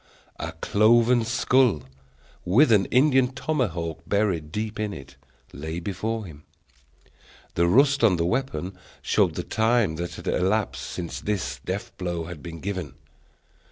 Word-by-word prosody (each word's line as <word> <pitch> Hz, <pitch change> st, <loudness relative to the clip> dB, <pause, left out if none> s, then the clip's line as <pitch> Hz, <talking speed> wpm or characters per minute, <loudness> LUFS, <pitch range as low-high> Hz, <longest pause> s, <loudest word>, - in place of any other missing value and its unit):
a -, -, -4 dB
cloven 115 Hz, +3 st, +4 dB
skull, 120 Hz, -, +2 dB, 0.6 s
with 115 Hz, +9 st, +4 dB
an 100 Hz, -3 st, +4 dB
Indian 130 Hz, 0 st, +4 dB
tomahawk 90 Hz, -, -2 dB
buried 95 Hz, -7 st, 0 dB
deep 105 Hz, +3 st, -4 dB
in 105 Hz, -1 st, -2 dB
it, -, -, -11 dB, 0.4 s
lay 80 Hz, +4 st, -5 dB
before 105 Hz, +5 st, -3 dB
him. 75 Hz, -5 st, -12 dB, 1.1 s
The 85 Hz, 0 st, +2 dB
rust 135 Hz, +7 st, +4 dB
on 105 Hz, -5 st, +5 dB
the 85 Hz, -1 st, 0 dB
weapon 95 Hz, -, -2 dB, 0.3 s
showed -, -, +2 dB
the -, -, -3 dB
time 110 Hz, -6 st, +1 dB
that 85 Hz, +1 st, -4 dB
had -, -, -10 dB
elapsed 100 Hz, +4 st, 0 dB
since 85 Hz, -2 st, -5 dB
this 105 Hz, -4 st, -2 dB
death -, -, -4 dB
blow 85 Hz, -2 st, -2 dB
had 80 Hz, -2 st, -8 dB
been 85 Hz, -2 st, -8 dB
given. 90 Hz, -8 st, -4 dB
100 Hz, 140 wpm, -25 LUFS, 85-115 Hz, 1.1 s, on